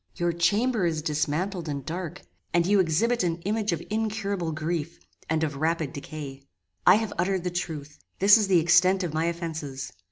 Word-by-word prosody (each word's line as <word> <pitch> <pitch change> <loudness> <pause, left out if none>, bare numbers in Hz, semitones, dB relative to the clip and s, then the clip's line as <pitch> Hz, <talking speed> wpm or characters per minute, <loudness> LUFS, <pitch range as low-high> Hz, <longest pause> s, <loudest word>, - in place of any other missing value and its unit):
Your 175 0 0
chamber 200 +4 +2
is 160 -2 -2
dismantled 160 +3 -1
and 140 -2 -4
dark, 170 0 -5 0.3
and 170 -1 +4
you 200 +2 +4
exhibit 205 +8 +2
an 170 -2 0
image 215 +1 0
of 170 -1 -2
incurable 205 -5 -1
grief, 155 +1 -3 0.3
and 160 0 +1
of 145 -3 -2
rapid 160 -1 0
decay. 140 -1 -7 0.5
"I - - +9
have 220 0 -1
uttered 185 0 +1
the 180 - -2
truth. 155 -5 -5 0.2
This 200 +2 +7
is 215 -3 +3
the 185 -3 +5
extent 180 +3 +4
of 170 -4 -3
my 160 +1 0
offences. 160 - -4
170 Hz, 180 wpm, -26 LUFS, 155-195 Hz, 0.5 s, I